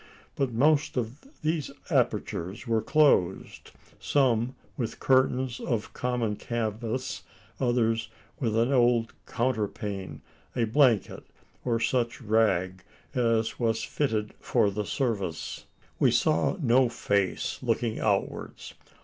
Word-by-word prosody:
But 135 -3 0
most 145 +5 +2
of 125 - -4 0.2
these 155 -2 0 0.2
apertures 95 +9 -1
were 115 -2 +1
closed, 140 - +2 0.3
some 125 -3 +1 0.2
with 115 -4 -4
curtains 130 -1 +2
of 110 -4 -2
common 120 -4 -1
canvas 115 +2 -3 0.4
others 115 -3 +1 0.3
with 115 -4 0
an 120 +4 +2
old 120 -2 +3
counterpane, 105 -5 -2 0.3
a 120 - +1
blanket, 115 -2 +2 0.4
or 115 -2 +1
such 120 0 0
rag 105 -5 +1 0.3
as 115 -3 +1
was 115 -2 +1
fitted 110 -7 -1
for 100 - +2
the 105 +1 -3
service. 100 - -2 0.3
We - - +5
saw 80 - +2
no 125 -3 +4
face 100 -4 -1
looking 115 -2 -1
outwards. 100 -3 -2
115 Hz, 110 wpm, -28 LUFS, 110-130 Hz, 0.4 s, We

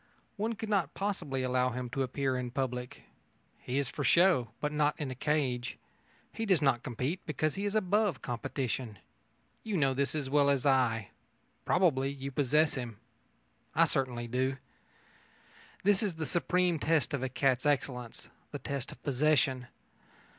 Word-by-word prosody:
One 220 +2 -1
could 220 0 -6
not 195 -8 0
possibly 165 -10 -2
allow 125 0 +2
him 125 +1 -4
to 135 - -1
appear 135 0 0
in 125 -1 -2
public. 125 -1 -3 0.6
He 125 - -3
is 140 -2 +1
for - - -4
show, 170 -10 +4
but 150 - -1
not 150 0 +2
in 145 -4 -3
a - - -2
cage. 130 -3 -1 0.6
He 225 - -3
does 190 -5 +4
not 135 -5 +2
compete, 130 - -3
because 155 0 0
he 200 - -3
is 205 +1 -1
above 210 0 +1
competition. 125 -2 -3 0.7
You 215 -4 -1
know 135 -4 +3
this 140 +2 0
as 145 -3 -2
well 140 +1 +3
as 140 -2 +1
I. 125 -6 +2 0.6
Probably 140 -8 +3
you 140 0 -6
possess 150 +3 +2
him. 120 -5 -5 0.8
I - - +6
certainly 125 -3 -2
do. 130 +2 0 1.3
That 200 0 +4
is 200 -6 -1
the 160 0 -3
supreme 175 0 +1
test 155 -2 +1
of 140 - -1
a 130 - -1
cat's 130 +1 +1
excellence 125 -4 -2 0.2
the - - -5
test 140 -2 -4
of - - -14
possession. 135 -3 +2
140 Hz, 160 wpm, -31 LUFS, 125-160 Hz, 1.3 s, I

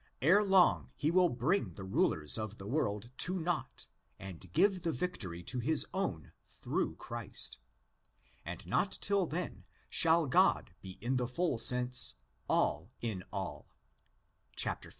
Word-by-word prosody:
Ere 185 - +5
long 175 - +4
he 155 - 0
will 180 0 +4
bring 125 - 0
the 100 - -8
rulers 80 -5 +1
of 110 0 -5
the 95 - -9
world 110 -3 -2
to 185 +2 +1
nought 175 -1 -3 0.3
and 95 -2 -10
give 195 - +3
the 165 -1 -1
victory 95 - -3
to 125 +8 -2
his 150 +6 +2
own 85 - -3
through - - -3
Christ; - - -2 0.8
and - - -7
not - - 0
till 200 -3 +1
then 170 +4 -4 0.3
shall 165 0 +5
God 125 -8 +3
be 95 0 -9
in 125 +4 0
the 125 -1 -1
full 140 -1 -1
sense 125 - +3 0.2
"' 65 +2 -41
all - - +1
in 105 -6 -3
all'' - - -5 0.9
(xv. - - 0
125 Hz, 150 wpm, -33 LUFS, -, 0.9 s, Ere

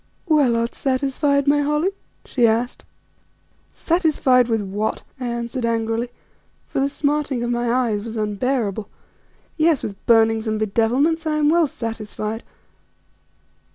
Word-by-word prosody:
"Well, 295 -8 +3
art 230 +1 -1
satisfied, 275 +1 0
my 290 +1 +4
Holly?" 300 +6 +1 0.3
she 240 -3 +2
asked. 230 +3 -1 0.9
"Satisfied 300 -7 +2
with 225 -3 0
what?" 205 +3 -3 0.2
I 250 - -3
answered 235 +1 -3
angrily, 230 +1 -1 0.6
for - - -3
the 275 +1 +2
smarting 285 -3 -1
of 240 - -1
my 240 0 0
eyes 235 -5 +1
was 230 0 -6
unbearable. 215 -1 -1 0.7
"Yes, 320 -3 +3
with 200 -2 -6
burnings 225 -1 +4
and 215 0 -1
bedevilments 250 +10 +1
I 305 -1 +1
am 300 -1 +3
well 335 0 +4
satisfied." 225 -2 -5
240 Hz, 130 wpm, -21 LUFS, 225-285 Hz, 0.9 s, my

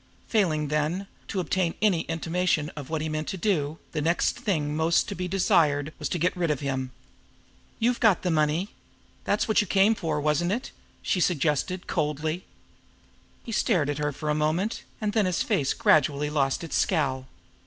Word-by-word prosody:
Failing, 155 -9 +1
then, 150 +6 0 0.2
to 195 - -2
obtain 180 -1 0
any 195 -6 +3
intimation 165 -1 0
of 145 -3 -9
what 160 -1 -2
he - - -2
meant 155 0 -3
to 190 - -3
do, 165 -6 0
the 155 - -2
next 165 +3 +1
thing 155 - -1
most 160 +2 +2
to - - -4
be 180 +1 -3
desired 155 -5 +2
was - - -2
to - - -1
get 175 +2 +1
rid 175 -2 0
of 150 - 0
him. 135 -2 -2 0.9
"You've 240 +2 +1
got 215 -5 +4
the 180 - +1
money. 155 +5 +1 0.6
That's 205 - +1
what 220 0 +4
you 210 - -4
came 195 +5 +4
for, 160 -8 -2
wasn't 155 +5 +1
it?" 245 +5 -4 0.3
she 185 - 0
suggested 170 +1 0
coldly. 155 +4 -2 1.0
He 230 - -7
stared 175 -9 +1
at 145 - -4
her 150 0 0
for 150 +2 -3
a - - +2
moment, 155 +8 0 0.2
and 210 -1 -1
then 215 -4 +2
his 180 - 0
face 135 -3 +1
gradually 150 0 +3
lost 135 0 0
its 165 - -4
scowl. 135 -7 0
160 Hz, 185 wpm, -26 LUFS, 150-185 Hz, 1.0 s, got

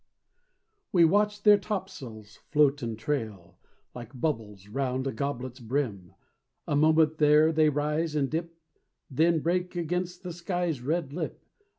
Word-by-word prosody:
We 175 -3 +6
watch 205 +4 +2
their 210 -1 +7
topsails 145 - -6
float 145 -1 +3
and 115 -2 -4
trail 110 -9 -4 0.3
Like 125 +1 -10
bubbles 110 -10 -3
'round 130 +3 -2
a 135 - -1
goblet's 130 0 -4
brim, 115 -7 -3 0.5
A - - 0
moment 155 +1 +3
there 150 +1 +5
they 155 -1 +4
rise 150 +2 -1
and 140 -2 +1
dip, 165 +3 -4 0.5
Then 160 +4 +2
break 180 +2 -1
against 180 +2 -3
the 180 -2 -5
sky's 175 -4 -2
red 150 +1 -2
lip. 175 - -5
150 Hz, 135 wpm, -28 LUFS, 125-170 Hz, 0.5 s, their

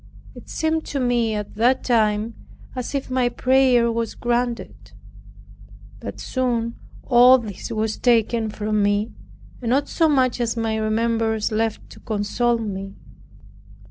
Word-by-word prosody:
It - - -13
seemed 320 0 -1
to 280 - -3
me 240 -3 +1
at 210 -1 -5
that 245 +4 +2
time 220 -2 +1 0.4
as 255 +2 -4
if 270 -2 -3
my 255 -1 +2
prayer 255 -2 +3
was 230 -1 -3
granted. 240 0 -3 1.1
But - - -7
soon 235 -3 -1 0.3
all 250 +1 +7
this 215 -6 -7
was 220 -1 -2
taken 230 -2 +2
from 210 0 -1
me, 205 +2 +1 0.5
and 235 - -3
not 275 +4 +2
so 325 -2 +2
much 255 -4 +2
as 235 0 -1
any 220 -1 -1
remembrance 220 0 0
left 220 0 -1
to - - -13
console 230 +3 0
me. 195 -3 -5
230 Hz, 140 wpm, -22 LUFS, 220-250 Hz, 1.1 s, all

